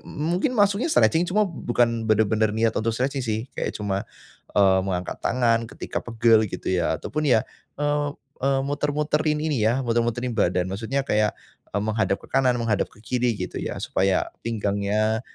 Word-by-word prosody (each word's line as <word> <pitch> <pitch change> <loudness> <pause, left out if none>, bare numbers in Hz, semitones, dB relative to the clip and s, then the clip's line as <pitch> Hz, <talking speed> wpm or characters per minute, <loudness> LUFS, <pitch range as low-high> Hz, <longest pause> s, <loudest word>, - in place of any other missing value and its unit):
mungkin 175 - -1
maksudnya 205 +8 +3
stretching, 170 - +4
cuma 210 +3 +3
bukan 120 - 0
benar-benar 110 0 +2
niat 110 0 +2
untuk 115 +1 0
stretching 135 0 -1
sih. 110 0 -2
Kayak - - -3
cuma 100 -2 -2 0.5
eee, 95 -2 +5
mengangkat 90 -2 -3
tangan 115 -2 +1
ketika - - -5
pegel 115 -2 +3
gitu - - -3
ya 90 -2 +1
ataupun 155 +2 -2
ya 110 -3 +4 0.3
eee, 145 0 0 0.3
eee 135 0 +2
muter-muterin 150 +1 0
ini 150 -8 0
ya, 125 +4 +1
muter-muterin 120 +1 0
badan. 90 -4 +1
Maksudnya 115 +7 -2
kayak 105 -4 +1 0.3
e - - -6
menghadap 110 -2 +1
ke - - -18
kanan, 130 -2 +3
menghadap 115 -4 0
ke - - -24
kiri 120 0 0
gitu - - -5
ya, - - -4
supaya 95 0 +1 0.2
pinggangnya 105 0 0
115 Hz, 160 wpm, -24 LUFS, 110-140 Hz, 0.5 s, eee